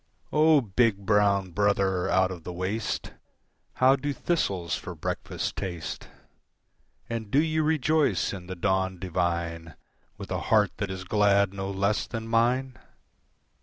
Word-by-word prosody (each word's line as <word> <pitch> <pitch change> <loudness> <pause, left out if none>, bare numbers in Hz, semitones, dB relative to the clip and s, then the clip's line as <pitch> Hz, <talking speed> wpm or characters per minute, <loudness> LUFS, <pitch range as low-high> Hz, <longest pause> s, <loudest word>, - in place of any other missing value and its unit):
"O 155 -1 +5
big, 105 -2 +1
brown 100 -2 +2
brother 95 -1 +1
out 95 0 +3
of 90 -3 -8
the 90 - -6
waste, 95 +5 -3 0.6
How 130 +1 +5
do 145 +2 -3
thistles 95 - -1
for - - -7
breakfast - - -4
taste? 85 -4 -5 1.0
"And 115 -3 -4
do 135 - +3
you 155 0 +1
rejoice 155 - +1
in 90 -2 -8
the 95 - -5
dawn 95 0 0
divine 85 -2 -2 0.4
With - - -9
a - - -1
heart 105 -4 +4
that 100 - -3
is 95 0 -5
glad 100 0 +3
no 95 0 -4
less 100 +2 0
than 115 -1 -5
mine? 120 +2 +1
100 Hz, 140 wpm, -27 LUFS, 95-120 Hz, 1.0 s, O